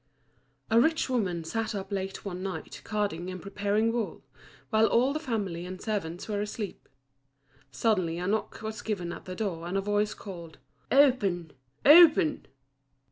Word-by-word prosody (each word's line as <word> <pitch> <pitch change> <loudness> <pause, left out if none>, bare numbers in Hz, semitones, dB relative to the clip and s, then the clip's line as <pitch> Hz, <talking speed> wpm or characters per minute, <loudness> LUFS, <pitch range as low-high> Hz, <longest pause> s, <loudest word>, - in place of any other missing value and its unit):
A 225 - +6
rich 320 -1 +1
woman 185 -9 0
sat 220 +6 -2
up 195 +1 -5
late 195 0 -4
one 180 -2 -5
night 190 -1 -6
carding 200 -5 -2
and 185 0 -6
preparing 205 +4 0
wool, 235 -4 -3 0.5
while 220 0 +5
all 255 +4 +3
the 305 - -2
family 205 - -3
and 185 +1 -7
servants 185 -6 -3
were 205 -2 -1
asleep. 210 -1 -6 0.8
Suddenly 170 - 0
a 180 - -3
knock 215 +2 -2
was 220 0 -5
given 180 -6 -3
at - - -10
the 185 - -6
door, 175 -6 -3
and 185 +3 -1
a - - +1
voice 205 +1 0
called 170 -5 -9 0.3
"Open! 210 - +3 0.3
open!" 315 +1 +7
205 Hz, 155 wpm, -28 LUFS, 180-225 Hz, 0.8 s, open